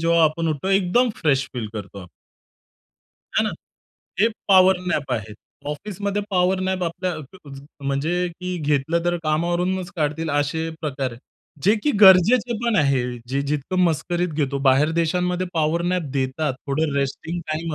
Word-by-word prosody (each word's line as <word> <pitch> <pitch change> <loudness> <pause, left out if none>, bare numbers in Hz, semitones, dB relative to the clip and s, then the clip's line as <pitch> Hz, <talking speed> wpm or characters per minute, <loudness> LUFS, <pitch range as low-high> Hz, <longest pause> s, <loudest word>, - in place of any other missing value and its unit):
जेव्हा 165 0 +3
आपण 160 +1 0
उठतो 155 +4 -2
एकदम 195 +6 +3
फ्रेश 135 -4 +1
फील 120 -3 -3
करतो 100 -1 -7
आपण. 90 - -10 1.3
आहे - - +4
ना? - - 0 0.7
हे 220 - +5 0.2
पॉवर 190 -1 +6
नॅप 145 -6 -1
आहे. 110 -3 -4 0.4
ऑफिसमध्ये 200 +5 -3
पॉवर 185 0 +2
नॅप 185 0 -1
आपल्या 180 +2 -2
अक 155 +2 -12
ज 135 - -9 0.2
म्हणजे 140 +5 0 0.2
कि 180 0 -3
घेतलं 150 +2 0
तर 175 0 +1
कामावरूनच 175 +4 0
काढतील 155 +1 -1
असे 145 +3 0
प्रकार 135 -4 -2
आहेत. 115 - -12 0.4
जे 205 - +5
कि 295 - +3
गरजेचे 210 +5 +6
पण 235 -3 +2
आहे 140 -6 +3 0.3
जे 135 +2 0
जितकं 150 +5 -2
मस्करीत 175 +2 0
घेतो. 140 -2 -1
बाहेर 135 +4 +4
देशांमध्ये 180 +2 0
पॉवर 160 +1 +1
नॅप 180 - 0
देतात. 135 +1 -1
थोडं 145 +1 0
रेस्टिंग 140 +5 -2
टाईम 160 0 -3
165 Hz, 155 wpm, -22 LUFS, 140-180 Hz, 1.3 s, पॉवर